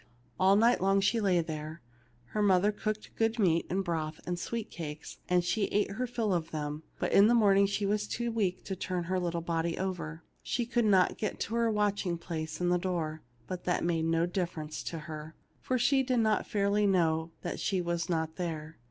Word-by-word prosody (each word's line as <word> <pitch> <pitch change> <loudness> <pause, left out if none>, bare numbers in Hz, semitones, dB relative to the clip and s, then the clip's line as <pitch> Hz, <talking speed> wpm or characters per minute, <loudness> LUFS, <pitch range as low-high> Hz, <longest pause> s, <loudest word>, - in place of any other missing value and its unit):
All 190 +1 +5
night 230 +4 +4
long, 195 +1 +3
as 195 - +2
she 230 +1 +2
lay 185 -4 +3
there, 155 -1 -6 0.5
her 215 - -1
mother 200 0 +4
cooked 215 0 -4
good 225 +1 +1
meat 170 -6 +2
and 195 +2 0
broth 160 -2 -2
and 175 -1 -2
sweet 230 +3 -4
cakes, 155 -2 -7
and 180 -1 +3
she 200 +3 +1
ate 205 -1 0
her 250 +5 -2
fill 230 -4 -1
of 165 -2 -1
them; 150 -1 -4 0.2
but - - -1
in 200 +2 +7
the 240 - +4
morning 200 -3 +5
she 200 +1 -1
was 210 +1 0
too 235 0 -2
weak 200 -5 -1
to 190 - -4
turn 180 -1 -2
her 185 +2 -1
little 170 -1 -2
body 165 0 -1
over. 175 -4 -4 0.2
She 240 - -1
could 240 -1 +1
not 190 -3 +4
get 210 - -2
to 220 - -2
her 235 0 +2
watching 205 -4 0
place 160 -2 -5
in 175 0 +1
the 180 0 +3
door, 165 -4 -2 0.2
but 180 +4 -6
that 180 - +1
made 165 -1 +1
no 165 +1 +2
difference 170 -4 -3
to 165 - -4
her, 155 0 -8 0.2
for 255 - -1
she 265 +3 +3
did 255 -1 0
not 220 -1 +1
fairly 205 -1 +2
know 165 -4 +2
that 175 - -3
she 195 -2 0
was 170 -1 -2
not 160 -2 -1
there. 160 -3 -4
180 Hz, 215 wpm, -30 LUFS, 165-210 Hz, 0.5 s, in